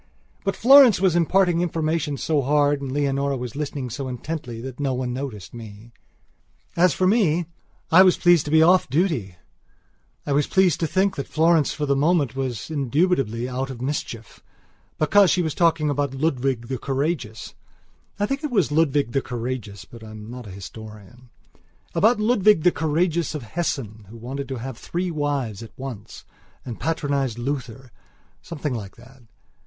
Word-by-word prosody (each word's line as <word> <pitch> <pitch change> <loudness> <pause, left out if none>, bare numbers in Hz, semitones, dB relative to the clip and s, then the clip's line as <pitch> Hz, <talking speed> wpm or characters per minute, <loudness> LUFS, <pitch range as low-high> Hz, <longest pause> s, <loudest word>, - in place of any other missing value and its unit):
But 195 - -1
Florence 265 -4 +7
was 185 -3 +2
imparting 175 0 +2
information 160 -3 -1
so 150 +1 0
hard 145 +1 +2
and 135 -2 -5
Leonora 140 -1 0
was 125 -1 -6
listening 140 -4 -4
so 135 +3 -5
intently 125 -2 -5
that 130 +2 -8
no 135 -3 -1
one 125 -1 -3
noticed 125 -7 -6
me. 110 -1 -11 0.8
As 175 +1 +4
for 185 - +1
me, 180 -5 +2 0.5
I 175 +3 +8
was 185 -1 +5
pleased 175 -3 +4
to 150 - -4
be 160 0 +6
off 180 +3 +4
duty; 135 - 0 0.9
I - - -3
was 145 +1 +2
pleased 190 -3 +2
to 165 - 0
think 190 +4 0
that 140 - -4
Florence 160 -2 +3
for 150 - -3
the 140 -1 +1
moment 145 -2 +1
was 130 0 -4
indubitably 135 - 0
out 130 +1 -3
of 130 - -7
mischiefbecause 145 - -2
she 180 - +2
was 160 -3 -2
talking 165 -3 +2
about 140 -1 -2
Ludwig 135 -4 -1
the 130 -1 -4
Courageous 135 -5 -3 0.7
(I 205 - +2
think 275 +7 -3
it 300 - -1
was 195 - +1
Ludwig 145 -5 +1
the 135 - 0
Courageous 120 -6 -5
but 115 -1 -13
I 110 - -10
am 110 +1 -10
not 125 -2 -9
an 95 - -9
historian) 110 +4 -11 0.6
about 215 +7 +3
Ludwig 210 -5 +3
the 180 - +5
Courageous 165 +1 0
of 150 - -5
Hessen 110 - -4
who 115 - -11
wanted 135 +4 -6
to 135 - -4
have 125 0 -7
three 180 +1 -3
wives 140 -9 -2
at 115 - -12
once 130 -6 -8 0.4
and 120 -4 -7
patronized 140 -6 -1
Luthersomething 130 - -7
like 100 -4 -7
that! 130 +2 -17
140 Hz, 165 wpm, -23 LUFS, 125-165 Hz, 0.9 s, I